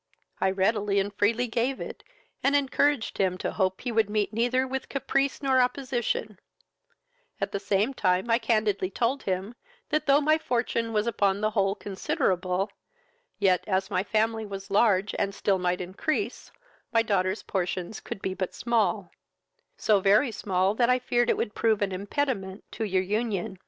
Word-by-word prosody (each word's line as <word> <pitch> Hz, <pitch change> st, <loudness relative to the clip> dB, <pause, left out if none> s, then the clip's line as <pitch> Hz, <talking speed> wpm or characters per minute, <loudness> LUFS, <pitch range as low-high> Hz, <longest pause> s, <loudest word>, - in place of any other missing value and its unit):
I 190 Hz, -, +2 dB
readily 200 Hz, +1 st, +1 dB
and 200 Hz, +1 st, -2 dB
freely 225 Hz, +5 st, +2 dB
gave 245 Hz, +3 st, -1 dB
it, -, -, -7 dB, 0.4 s
and 280 Hz, +1 st, +3 dB
encouraged 285 Hz, -2 st, +1 dB
him 185 Hz, -2 st, +1 dB
to -, -, -3 dB
hope 190 Hz, -2 st, 0 dB
he 250 Hz, -, -3 dB
would 225 Hz, -2 st, +2 dB
meet 210 Hz, 0 st, 0 dB
neither 245 Hz, +3 st, +1 dB
with 265 Hz, 0 st, -4 dB
caprice 275 Hz, +1 st, -1 dB
nor 260 Hz, -1 st, +4 dB
opposition; 245 Hz, -5 st, -1 dB, 1.0 s
at 200 Hz, 0 st, -2 dB
the 200 Hz, -, -2 dB
same 200 Hz, +5 st, +1 dB
time 185 Hz, -3 st, +1 dB
I 230 Hz, 0 st, +3 dB
candidly 215 Hz, -5 st, +1 dB
told 245 Hz, +6 st, 0 dB
him, 190 Hz, +3 st, -3 dB, 0.4 s
that, 305 Hz, 0 st, 0 dB
though 280 Hz, +1 st, +6 dB
my 310 Hz, +2 st, +3 dB
fortune 235 Hz, -4 st, -1 dB
was 210 Hz, -1 st, +1 dB
upon 200 Hz, -4 st, +1 dB
the 215 Hz, +1 st, 0 dB
whole 195 Hz, -2 st, +1 dB
considerable, 190 Hz, -1 st, -1 dB, 0.7 s
yet, 190 Hz, -3 st, +3 dB
as 190 Hz, 0 st, 0 dB
my 185 Hz, -1 st, +1 dB
family 220 Hz, +1 st, 0 dB
was 195 Hz, -1 st, -7 dB
large 200 Hz, -1 st, +3 dB
and 200 Hz, 0 st, -1 dB
still 195 Hz, -2 st, +1 dB
might 180 Hz, 0 st, 0 dB
increase, 250 Hz, -, -3 dB, 0.4 s
my 230 Hz, -1 st, +3 dB
daughter's 190 Hz, -2 st, 0 dB
portions 185 Hz, +1 st, -3 dB
could 195 Hz, -, -8 dB
be 190 Hz, -, -1 dB
but 185 Hz, -1 st, -4 dB
small, 235 Hz, -2 st, 0 dB, 0.7 s
so 210 Hz, -2 st, +3 dB
very 210 Hz, +7 st, +4 dB
small, 190 Hz, -2 st, 0 dB
that 240 Hz, +2 st, +2 dB
I 250 Hz, -, +5 dB
feared 240 Hz, -1 st, +1 dB
it -, -, +2 dB
would 210 Hz, -, -2 dB
prove 220 Hz, -2 st, +2 dB
an 195 Hz, -, -1 dB
impediment 200 Hz, 0 st, -2 dB
to 220 Hz, -, -3 dB
your 190 Hz, -2 st, +1 dB
union. 200 Hz, -2 st, -2 dB
210 Hz, 170 wpm, -27 LUFS, 195-240 Hz, 1.0 s, though